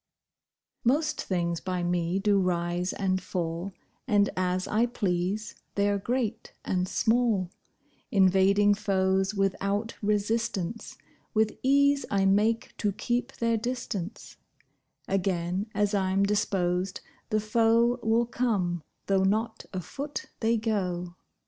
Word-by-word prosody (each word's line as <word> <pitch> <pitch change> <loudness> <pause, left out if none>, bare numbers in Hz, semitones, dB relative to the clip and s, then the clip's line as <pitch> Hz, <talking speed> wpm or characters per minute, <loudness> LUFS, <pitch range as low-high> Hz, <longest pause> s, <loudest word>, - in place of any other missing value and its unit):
Most 300 +5 +1
things 170 -3 -1
by 185 -2 -2
me 175 +1 0
do 200 0 +3
rise 175 0 0
and 185 -1 -1
fall, 170 +1 -3 0.4
And, 205 -3 +3
as 185 0 0
I 225 +3 +2
please, 200 -2 -1 0.2
they're 200 0 +2
great 240 +1 -2
and 185 0 0
small; 225 -6 +2 0.6
Invading 195 +1 +4
foes 190 0 +1
without 200 +2 -1
resistance, 210 -1 -1 0.4
With 215 0 +2
ease 280 +1 +3
I 195 -1 +2
make 210 +4 +2
to 205 - 0
keep 245 +5 -2
their 230 -1 +1
distance: 225 -5 -5 0.7
Again, 185 0 -1
as 205 0 +1
I'm 195 0 +2
disposed, 190 -2 0 0.3
the 215 - +2
foe 230 +3 +3
Will 225 +1 +2
come, 205 -8 0 0.2
though 195 -1 +2
not 220 +3 0
a 185 - -3
foot 280 - -6
they 230 0 +2
go. 180 -6 -2
200 Hz, 115 wpm, -28 LUFS, 185-225 Hz, 0.7 s, Invading